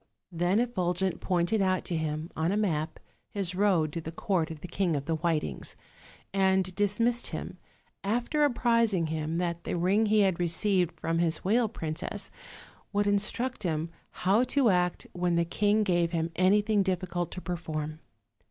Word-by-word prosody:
Then 175 Hz, +4 st, +1 dB
Effulgent 185 Hz, -6 st, 0 dB
pointed 185 Hz, +4 st, +1 dB
out 185 Hz, -1 st, +1 dB
to 175 Hz, -, -2 dB
him, 155 Hz, 0 st, -3 dB
on 160 Hz, +3 st, 0 dB
a 205 Hz, -, +1 dB
map, 160 Hz, -7 st, -1 dB, 0.3 s
his 195 Hz, -3 st, -2 dB
road 180 Hz, -6 st, +2 dB
to 165 Hz, -, -3 dB
the 160 Hz, -, -6 dB
court 170 Hz, -1 st, 0 dB
of 160 Hz, -2 st, -8 dB
the -, -, -6 dB
King 175 Hz, -2 st, 0 dB
of 140 Hz, -1 st, -3 dB
the 165 Hz, -, -1 dB
Whitings; 155 Hz, -, -2 dB, 0.6 s
and 190 Hz, -1 st, +2 dB
dismissed 220 Hz, +5 st, +1 dB
him, -, -, -6 dB, 0.4 s
after 240 Hz, +8 st, +1 dB
apprising 230 Hz, -, +2 dB
him 160 Hz, +1 st, -2 dB
that 170 Hz, -1 st, -2 dB
the -, -, -2 dB
ring 195 Hz, +6 st, +2 dB
he 215 Hz, 0 st, +4 dB
had 190 Hz, -4 st, +2 dB
received 175 Hz, 0 st, +1 dB
from 165 Hz, 0 st, 0 dB
his 165 Hz, -1 st, 0 dB
whale 225 Hz, +3 st, +3 dB
princess 160 Hz, -5 st, -4 dB, 0.6 s
would 205 Hz, 0 st, +1 dB
instruct 210 Hz, +5 st, 0 dB
him 165 Hz, -3 st, -2 dB, 0.3 s
how 205 Hz, +6 st, +5 dB
to 260 Hz, -4 st, +3 dB
act 180 Hz, -1 st, 0 dB
when 175 Hz, -1 st, 0 dB
the 170 Hz, 0 st, +2 dB
king 205 Hz, +5 st, +2 dB
gave 175 Hz, -3 st, +1 dB
him 165 Hz, 0 st, -1 dB
anything 205 Hz, +3 st, +3 dB
difficult 180 Hz, -2 st, -1 dB
to -, -, -5 dB
perform. 155 Hz, -4 st, -4 dB
180 Hz, 165 wpm, -29 LUFS, 165-205 Hz, 0.6 s, how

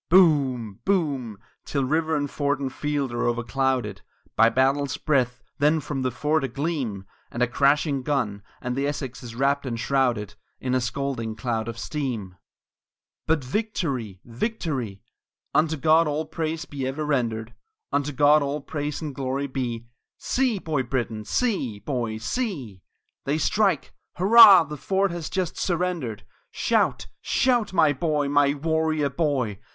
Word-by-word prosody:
III 180 Hz, -, +8 dB
Boom! 130 Hz, -, +3 dB
Boom! 140 Hz, -, 0 dB, 0.2 s
till 140 Hz, -2 st, -1 dB
river 160 Hz, +4 st, +1 dB
and 145 Hz, -1 st, -1 dB
fort 145 Hz, -1 st, 0 dB
and 135 Hz, -2 st, -3 dB
field 145 Hz, -3 st, -2 dB
are 120 Hz, -, 0 dB
overclouded 120 Hz, -3 st, -1 dB, 0.3 s
By 115 Hz, -, +6 dB
battle's 135 Hz, +3 st, +1 dB
breath; 125 Hz, -5 st, 0 dB, 0.2 s
then 150 Hz, +3 st, +3 dB
from 145 Hz, -2 st, -4 dB
the 130 Hz, -, +1 dB
fort 150 Hz, +5 st, 0 dB
a -, -, 0 dB
gleam 130 Hz, -, -3 dB, 0.2 s
And 120 Hz, -, -1 dB
a -, -, +3 dB
crashing 140 Hz, +2 st, +2 dB
gun, 125 Hz, -8 st, -1 dB, 0.2 s
and 125 Hz, 0 st, -2 dB
the 140 Hz, +1 st, 0 dB
Essex 135 Hz, -3 st, -4 dB
is 120 Hz, -2 st, -9 dB
wrapt 140 Hz, +2 st, +1 dB
and 120 Hz, -4 st, -4 dB
shrouded 120 Hz, -6 st, 0 dB, 0.3 s
In 130 Hz, -1 st, -2 dB
a 130 Hz, -, +2 dB
scalding 120 Hz, -2 st, -3 dB
cloud 110 Hz, -1 st, -2 dB
of 115 Hz, -1 st, -5 dB
steam! 120 Hz, -7 st, -3 dB
IV 90 Hz, -, -25 dB, 0.9 s
But 160 Hz, -3 st, +2 dB
victory! 130 Hz, -, -2 dB
victory! 125 Hz, -, -3 dB, 0.5 s
Unto 160 Hz, +1 st, +2 dB
God 160 Hz, +3 st, +4 dB
all 150 Hz, +2 st, -1 dB
praise 160 Hz, +1 st, -3 dB
be 135 Hz, -2 st, -4 dB
ever 145 Hz, +3 st, -3 dB
rendered, 120 Hz, -5 st, -1 dB, 0.4 s
Unto 145 Hz, +1 st, 0 dB
God 145 Hz, +2 st, +5 dB
all 140 Hz, +1 st, -1 dB
praise 150 Hz, +1 st, -4 dB
and 150 Hz, -2 st, -4 dB
glory 135 Hz, +1 st, -2 dB
be! 125 Hz, -4 st, -3 dB, 0.3 s
See, 255 Hz, -4 st, 0 dB
Boy 155 Hz, -6 st, -1 dB
Brittan! 120 Hz, -4 st, -3 dB
see, 190 Hz, -, 0 dB
boy, 115 Hz, 0 st, -3 dB
see! 130 Hz, -, -3 dB, 0.4 s
They 145 Hz, +3 st, +1 dB
strike! 200 Hz, +4 st, +1 dB, 0.2 s
Hurrah! 200 Hz, -1 st, +9 dB
the 150 Hz, -1 st, -7 dB
fort 195 Hz, +4 st, 0 dB
has 170 Hz, -3 st, -5 dB
just 185 Hz, -3 st, -2 dB
surrendered! 175 Hz, -, -2 dB, 0.2 s
Shout! -, -, +1 dB, 0.2 s
Shout! 245 Hz, -5 st, +2 dB
my 160 Hz, -5 st, +4 dB
boy, 150 Hz, 0 st, 0 dB
my 145 Hz, 0 st, +3 dB
warrior 155 Hz, -1 st, 0 dB
boy! 130 Hz, -, -1 dB
140 Hz, 155 wpm, -25 LUFS, 120-155 Hz, 0.9 s, Hurrah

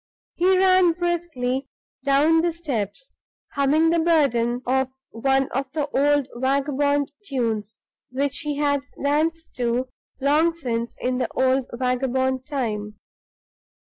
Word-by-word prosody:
He 370 Hz, +2 st, +3 dB
ran 370 Hz, -2 st, +5 dB
briskly 325 Hz, -7 st, -2 dB, 0.4 s
down 285 Hz, +4 st, +4 dB
the 340 Hz, 0 st, +1 dB
steps, 295 Hz, -, -4 dB, 0.4 s
humming 300 Hz, +4 st, +3 dB
the 335 Hz, -, +2 dB
burden 255 Hz, -7 st, +2 dB
of 265 Hz, +1 st, +1 dB, 0.2 s
one 270 Hz, +3 st, +1 dB
of 270 Hz, +1 st, -3 dB
the 300 Hz, -2 st, -1 dB
old 285 Hz, -1 st, +2 dB
vagabond 280 Hz, +2 st, +1 dB
tunes 225 Hz, -, -2 dB, 0.3 s
which 275 Hz, +2 st, -1 dB
he 295 Hz, -3 st, -3 dB
had 285 Hz, -1 st, +1 dB, 0.2 s
danced 320 Hz, +3 st, 0 dB
to 245 Hz, +1 st, 0 dB, 0.3 s
long 300 Hz, +5 st, +3 dB
since 235 Hz, -7 st, -3 dB
in 250 Hz, 0 st, -1 dB
the -, -, -2 dB
old 260 Hz, 0 st, +2 dB
vagabond 260 Hz, +1 st, -1 dB
time. 210 Hz, -7 st, -3 dB
275 Hz, 120 wpm, -23 LUFS, 250-310 Hz, 0.4 s, ran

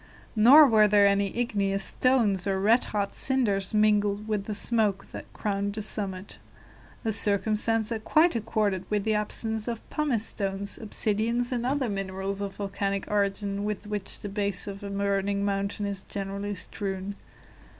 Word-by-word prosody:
Nor 260 Hz, +8 st, +8 dB
were 215 Hz, -5 st, +5 dB
there 205 Hz, 0 st, +5 dB
any 200 Hz, 0 st, +3 dB
igneous 200 Hz, -5 st, 0 dB
stones 220 Hz, -8 st, +2 dB
or 190 Hz, -1 st, 0 dB
red 220 Hz, +5 st, +3 dB
hot 200 Hz, -2 st, -2 dB
cinders 210 Hz, -8 st, 0 dB
mingled 210 Hz, -1 st, +2 dB
with 210 Hz, -2 st, -1 dB
the 210 Hz, -, -4 dB
smoke 205 Hz, -3 st, 0 dB
that -, -, -9 dB
crowned 200 Hz, -1 st, -2 dB
the 215 Hz, -, -3 dB
summit; 195 Hz, -2 st, -3 dB, 0.7 s
a 220 Hz, -, +1 dB
circumstance 215 Hz, +2 st, +1 dB
that 225 Hz, -2 st, -4 dB
quite 315 Hz, +3 st, +3 dB
accorded 210 Hz, -4 st, 0 dB
with 210 Hz, -1 st, 0 dB
the 220 Hz, -, +1 dB
absence 215 Hz, +1 st, -2 dB
of 235 Hz, -, -1 dB
the -, -, -19 dB
pumice 275 Hz, -8 st, +1 dB
stones, 200 Hz, -1 st, -3 dB
obsidians, 225 Hz, +3 st, -1 dB
and 245 Hz, -1 st, -1 dB
other 270 Hz, -1 st, 0 dB
minerals 195 Hz, -1 st, -3 dB
of 200 Hz, -1 st, -4 dB
volcanic 200 Hz, -1 st, -2 dB
origin 200 Hz, 0 st, 0 dB
with 210 Hz, 0 st, -3 dB
which 210 Hz, -2 st, -3 dB
the -, -, -5 dB
base 200 Hz, -2 st, -2 dB
of 200 Hz, 0 st, -7 dB
a 200 Hz, -, -6 dB
burning 200 Hz, 0 st, 0 dB
mountain 200 Hz, +1 st, -2 dB
is 200 Hz, -1 st, -3 dB
generally 200 Hz, +1 st, -5 dB
strewn. 195 Hz, +1 st, -4 dB
205 Hz, 160 wpm, -27 LUFS, 200-220 Hz, 0.7 s, Nor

